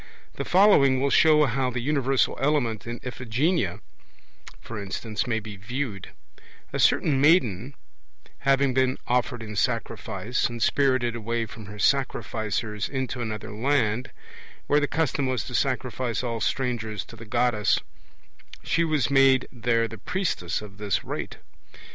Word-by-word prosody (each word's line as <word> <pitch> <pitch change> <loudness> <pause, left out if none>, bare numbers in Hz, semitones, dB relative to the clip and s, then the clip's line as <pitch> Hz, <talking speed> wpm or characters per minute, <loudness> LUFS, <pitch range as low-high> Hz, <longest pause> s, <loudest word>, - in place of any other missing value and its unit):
The - - -5
following 175 -9 +5
will 140 +1 +1
show 150 0 +6
how 130 0 0
the 125 0 -3
universal 135 0 +1
element 135 -7 0
in 120 +1 -5
Iphigenia, 125 - -1 0.8
for 110 -2 -7
instance, 105 +3 -3
may 110 -2 0
be 105 -1 -9
viewed: 110 -1 -4 0.6
A - - -2
certain 135 -3 +3
maiden 140 - +3 0.6
having 135 0 +2
been 130 0 +2
offered 120 -1 0
in 105 -1 -7
sacrifice, 115 -1 -1
and 120 0 -6
spirited 130 -2 +2
away 115 0 -2
from 110 -2 -11
her 105 +1 -9
sacrificers 110 -3 -1
into 130 -2 -3
another 110 -2 -5
land, 115 0 0 0.6
where 145 - +3
the 145 - 0
custom 145 -3 0
was 130 -1 -1
to 125 - -8
sacrifice 125 -2 -1
all 115 -2 -3
strangers 115 -6 -2
to - - -12
the 115 - -11
Goddess, 110 -1 +2 0.8
she 170 - +1
was 150 -6 0
made 135 -1 +5
there 115 -2 +1
the 115 0 -10
priestess 105 - -2
of 100 -1 -12
this 105 -3 -1
rite. - - -5
125 Hz, 140 wpm, -25 LUFS, 110-135 Hz, 0.8 s, show